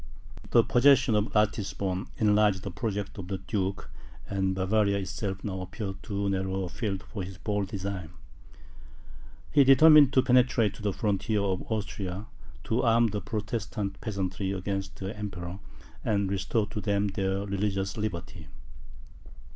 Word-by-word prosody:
The 115 Hz, -, +5 dB
possession 125 Hz, -1 st, +5 dB
of 105 Hz, -1 st, +3 dB
Ratisbon, 100 Hz, -2 st, 0 dB
enlarged 105 Hz, -3 st, +3 dB
the -, -, -4 dB
projects 105 Hz, -3 st, -4 dB
of 90 Hz, -, -6 dB
the 95 Hz, 0 st, -2 dB
duke, 95 Hz, 0 st, -3 dB, 0.4 s
and 95 Hz, -1 st, 0 dB
Bavaria 100 Hz, +1 st, +2 dB
itself 95 Hz, 0 st, -4 dB
now 95 Hz, -2 st, -3 dB
appeared 95 Hz, +1 st, -6 dB
too 100 Hz, -1 st, -2 dB
narrow 95 Hz, 0 st, -1 dB
a 90 Hz, -, -4 dB
field 100 Hz, -1 st, -3 dB
for 105 Hz, -, -7 dB
his 95 Hz, 0 st, -7 dB
bold 105 Hz, -1 st, -1 dB
designs. 95 Hz, -3 st, -4 dB, 1.4 s
He 145 Hz, -, +6 dB
determined 145 Hz, +1 st, +8 dB
to 130 Hz, -, +5 dB
penetrate 125 Hz, -4 st, +3 dB
to 110 Hz, -, -12 dB
the 105 Hz, -1 st, 0 dB
frontiers 105 Hz, +1 st, 0 dB
of 95 Hz, +2 st, -2 dB
Austria, 100 Hz, -2 st, -3 dB, 0.4 s
to 115 Hz, -, 0 dB
arm 115 Hz, -1 st, +4 dB
the 105 Hz, 0 st, -3 dB
Protestant 105 Hz, -1 st, -4 dB
peasantry 95 Hz, -2 st, -2 dB
against 95 Hz, 0 st, -3 dB
the 95 Hz, +2 st, -5 dB
Emperor, 95 Hz, -3 st, -6 dB, 0.4 s
and 100 Hz, -2 st, 0 dB
restore 100 Hz, +3 st, 0 dB
to 110 Hz, -1 st, -4 dB
them 100 Hz, -1 st, +1 dB
their 95 Hz, 0 st, -1 dB
religious 100 Hz, -1 st, -1 dB
liberty. 105 Hz, -6 st, -5 dB
100 Hz, 145 wpm, -28 LUFS, 95-110 Hz, 1.4 s, determined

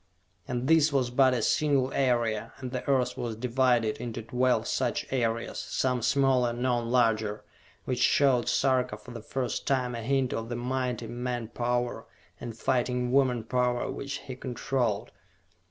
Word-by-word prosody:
And 125 Hz, +1 st, -2 dB
this 155 Hz, -1 st, +5 dB
was 130 Hz, -3 st, +1 dB
but 130 Hz, 0 st, +4 dB
a 115 Hz, -, -1 dB
single 140 Hz, -2 st, +2 dB
area, 115 Hz, -4 st, 0 dB
and 130 Hz, -2 st, -6 dB
the 125 Hz, -1 st, -3 dB
earth 125 Hz, -2 st, +2 dB
was 115 Hz, -2 st, -4 dB
divided 120 Hz, -1 st, +1 dB
into 115 Hz, -1 st, -5 dB
twelve 125 Hz, +3 st, +1 dB
such -, -, -1 dB
areas, 115 Hz, -2 st, -1 dB
some 125 Hz, -2 st, -1 dB
smaller, 130 Hz, -1 st, +2 dB
none 120 Hz, -1 st, 0 dB
larger, 110 Hz, -4 st, +1 dB, 0.4 s
which 125 Hz, -2 st, -2 dB
showed 130 Hz, -4 st, +3 dB
Sarka 130 Hz, -5 st, +1 dB
for 110 Hz, +4 st, -13 dB
the 115 Hz, -2 st, -7 dB
first 125 Hz, +2 st, -3 dB
time 130 Hz, -2 st, +1 dB
a 115 Hz, -, -4 dB
hint 130 Hz, +1 st, 0 dB
of 115 Hz, 0 st, -4 dB
the 120 Hz, -, -3 dB
mighty 125 Hz, 0 st, -2 dB
man 120 Hz, -1 st, -4 dB
power, 120 Hz, 0 st, -2 dB, 0.3 s
and 115 Hz, -2 st, -7 dB
fighting 125 Hz, 0 st, 0 dB
woman 130 Hz, -4 st, +2 dB
power 125 Hz, +1 st, 0 dB
which 140 Hz, 0 st, -5 dB
he 130 Hz, -, -7 dB
controlled. 125 Hz, -4 st, -2 dB
125 Hz, 155 wpm, -28 LUFS, 120-130 Hz, 0.4 s, this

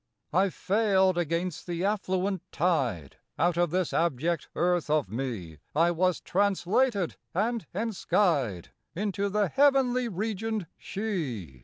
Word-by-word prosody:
I 190 Hz, +3 st, +4 dB
failed 190 Hz, -1 st, +2 dB
against 170 Hz, +1 st, -2 dB
the 175 Hz, +1 st, -2 dB
affluent 190 Hz, -2 st, 0 dB
tide; 135 Hz, -, 0 dB, 0.2 s
Out 175 Hz, +1 st, +2 dB
of 175 Hz, 0 st, +2 dB
this 180 Hz, +1 st, -1 dB
abject 165 Hz, 0 st, 0 dB
earth 175 Hz, -2 st, +1 dB
of 150 Hz, -10 st, +1 dB
me 105 Hz, -, -4 dB, 0.2 s
I 170 Hz, +3 st, +4 dB
was 180 Hz, +1 st, +1 dB
translated 200 Hz, +1 st, +1 dB, 0.2 s
and 220 Hz, -1 st, 0 dB
enskied 175 Hz, -, 0 dB, 0.3 s
Into 200 Hz, +1 st, -1 dB
the 205 Hz, 0 st, +1 dB
heavenly 265 Hz, -1 st, +3 dB
regioned 215 Hz, +1 st, -2 dB
She. 135 Hz, -, -4 dB
180 Hz, 120 wpm, -28 LUFS, 160-205 Hz, 0.3 s, I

